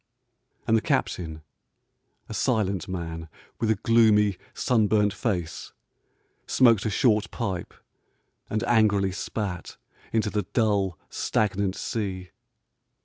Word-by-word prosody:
And 110 Hz, -, +3 dB
the 110 Hz, -, +3 dB
captain, 80 Hz, -6 st, -1 dB, 0.8 s
a -, -, -7 dB
silent 100 Hz, -7 st, 0 dB
man 80 Hz, -3 st, -5 dB, 0.3 s
with 115 Hz, -, 0 dB
a 110 Hz, -, +4 dB
gloomy, 105 Hz, -2 st, +4 dB, 0.2 s
sunburnt 105 Hz, -4 st, +2 dB
face, 90 Hz, -9 st, -3 dB, 0.7 s
smoked 115 Hz, -5 st, +4 dB
a -, -, +1 dB
short 105 Hz, +1 st, +2 dB
pipe 95 Hz, -7 st, -4 dB, 0.8 s
and 110 Hz, -, -1 dB
angrily 100 Hz, -4 st, +3 dB
spat 95 Hz, -1 st, -4 dB, 0.3 s
into 110 Hz, -2 st, +1 dB
the 105 Hz, -, 0 dB
dull, 100 Hz, -6 st, +1 dB
stagnant 100 Hz, -2 st, 0 dB
sea. 95 Hz, -5 st, -4 dB
105 Hz, 105 wpm, -26 LUFS, 95-110 Hz, 0.8 s, a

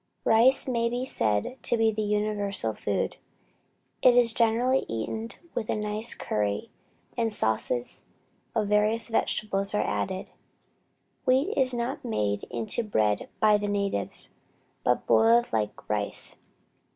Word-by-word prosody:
Rice 240 Hz, +5 st, +5 dB
may 235 Hz, -2 st, 0 dB
be 245 Hz, +2 st, -3 dB
said 110 Hz, -, +2 dB
to 235 Hz, -, +3 dB
be 225 Hz, 0 st, +3 dB
the 215 Hz, 0 st, -3 dB
universal 205 Hz, -, 0 dB
food. 105 Hz, -1 st, -3 dB, 0.8 s
It 245 Hz, -1 st, +5 dB
is 235 Hz, -2 st, +5 dB
generally 240 Hz, +4 st, +2 dB
eaten 165 Hz, -, -4 dB, 0.2 s
with 220 Hz, -, -4 dB
a -, -, 0 dB
nice 210 Hz, +1 st, -2 dB
curry, 105 Hz, -1 st, -3 dB, 0.4 s
and 230 Hz, -1 st, 0 dB
sauces 120 Hz, -, -2 dB, 0.5 s
of 215 Hz, -2 st, 0 dB
various 210 Hz, +2 st, +2 dB
vegetables 205 Hz, -3 st, -1 dB
are -, -, +1 dB
added. 190 Hz, 0 st, -3 dB, 0.9 s
Wheat 265 Hz, +10 st, +2 dB
is 265 Hz, -2 st, +3 dB
not 240 Hz, +2 st, -3 dB
made 105 Hz, -2 st, -1 dB
into 115 Hz, -, +1 dB
bread 105 Hz, -, 0 dB
by 210 Hz, -1 st, +4 dB
the 205 Hz, -, -3 dB
natives, 200 Hz, -1 st, +1 dB, 0.5 s
but -, -, +1 dB
boiled 235 Hz, -, +3 dB
like 105 Hz, -2 st, -3 dB
rice. 105 Hz, -1 st, -3 dB
210 Hz, 130 wpm, -26 LUFS, -, 0.9 s, Rice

